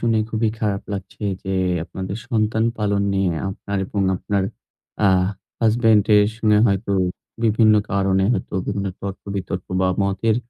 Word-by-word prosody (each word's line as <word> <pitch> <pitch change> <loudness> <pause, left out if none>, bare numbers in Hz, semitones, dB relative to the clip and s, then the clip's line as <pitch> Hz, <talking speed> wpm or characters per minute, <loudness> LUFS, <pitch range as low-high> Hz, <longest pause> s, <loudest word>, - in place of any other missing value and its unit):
শুনে 115 -1 +2
খুবই 110 0 +1
খারাপ 100 -2 -1
লাগছে 100 +1 -7 0.2
যে, 95 - -5 0.3
আপনাদের 95 +3 -5
সন্তান 110 0 +1
পালন 100 -1 +1
নিয়ে 95 -2 +1 0.2
আপনার 100 +1 -4
এবং 100 - -3 0.2
আপনার 100 +1 -1 0.6
আ - - +6 0.5
হাসব্যান্ডের 110 -2 +4
সঙ্গে 105 -3 +3
হয়তো 100 0 0 0.5
বিভিন্ন 110 -1 +5 0.2
কারণে 95 -1 +2
হয়তো 105 - -3
বিভিন্ন 100 -1 -2
তর্ক-বিতর্ক 95 -2 -5
বা, 95 - +3
মতের 100 +3 +1
100 Hz, 130 wpm, -21 LUFS, 95-110 Hz, 0.6 s, আ